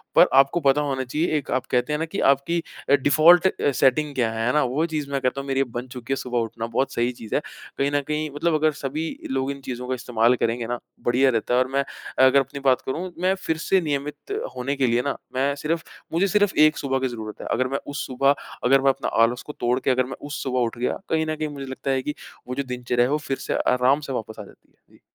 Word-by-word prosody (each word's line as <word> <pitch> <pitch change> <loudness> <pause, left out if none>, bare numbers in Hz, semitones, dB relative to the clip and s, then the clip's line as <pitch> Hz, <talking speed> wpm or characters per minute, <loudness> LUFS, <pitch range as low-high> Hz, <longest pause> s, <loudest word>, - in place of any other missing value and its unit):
पर - - +8
आपको 135 +5 +5
पता 140 -1 +3
होना 135 -3 -1
चाहिए 150 +7 -1
एक 145 - -5
आप 130 0 0
कहते 125 +4 +1
हैं 150 - -1
ना 160 - 0
कि 165 +5 -5
आपकी 155 +5 -2 0.3
अ, - - +5
डिफ़ॉल्ट 155 +6 +6 0.3
सेटिंग 145 +3 +2
क्या 120 -3 +1
है।" 115 0 -2
है 125 - +2
ना? 150 - +3
वो 135 +6 0
चीज़ 155 -4 -3
मैं 140 -1 -1
कहता 130 +1 0
हूँ 140 - -10
मेरी 135 0 +1
अब 130 -3 -2
बन 120 +2 -5
चुकी 125 +1 -7
है - - +1
सुबह 125 -2 -2
उठना, 115 0 -3
बहुत 120 +4 -1
सही 120 +1 +1
चीज़ 115 -3 -6
है। - - +2 0.4
कहीं 140 +1 +1
न 145 0 +1
कहीं, 150 0 -1
मतलब 165 +3 +1
अगर 155 0 +3
सभी 155 +4 -2 0.2
लोग 135 +1 0
इन 140 0 -8
चीज़ों 125 -1 -6
का 130 - -1
इस्तेमाल 120 -1 +2
करेंगे 115 -1 -1
ना, 120 0 -3 0.3
बढ़िया 125 +3 +4
रहता 115 0 0
है। 125 - +4
और 130 - +2
मैं 140 +1 +1 0.4
अगर 130 +1 +6
अपनी 140 +1 -4
बात 130 -2 +4
करूँ, 175 +7 -4
मैं 185 +2 +2
फिर 160 - -1
से 190 +4 +2
नियमित 145 -2 -2 0.4
होने 130 +3 -2
के 135 -2 +1
लिए 120 +1 +2
ना, 140 +1 -2 0.2
मैं 135 +2 +1
सिर्फ़ 160 +3 -2 0.3
मुझे 180 +4 +2
सिर्फ़ 205 0 +2
एक 155 0 +6
सुबह 135 -1 -1
की 130 - 0
ज़रूरत 110 -3 -7
है। - - -6
अगर 130 +1 +1
मैं 135 +1 -2
उस 145 -1 -4
सुबह, 135 +2 +2 0.3
अगर 135 +2 +4
मैं 135 - +4
अपने 135 - -1
आलस 120 +2 +3
को 150 - -6
तोड़ 125 +2 +1
के, 130 - +1
अगर 130 0 +2
मैं 135 - -7
उस 145 - -4
सुबह 130 -1 -1
उठ 120 -1 -1
गया, 120 - -1
कहीं 160 0 +1
न 155 0 -2
कहीं 155 0 -3
मुझे 140 -2 -7
लगता 130 +1 -4
है 135 -1 +1
कि 150 - -3 0.3
वो 125 - -4
जो 140 - -1
दिनचर्या 125 -1 0
है 130 - -2
वो 150 - +2
फिर 135 - -1
से - - -3 0.2
आराम 125 +3 +3
से - - -2
वापस 110 -2 -5
आ - - -5
जाती - - -19 0.2
है। - - -21
जी। - - -23
135 Hz, 265 wpm, -24 LUFS, 125-150 Hz, 0.4 s, पर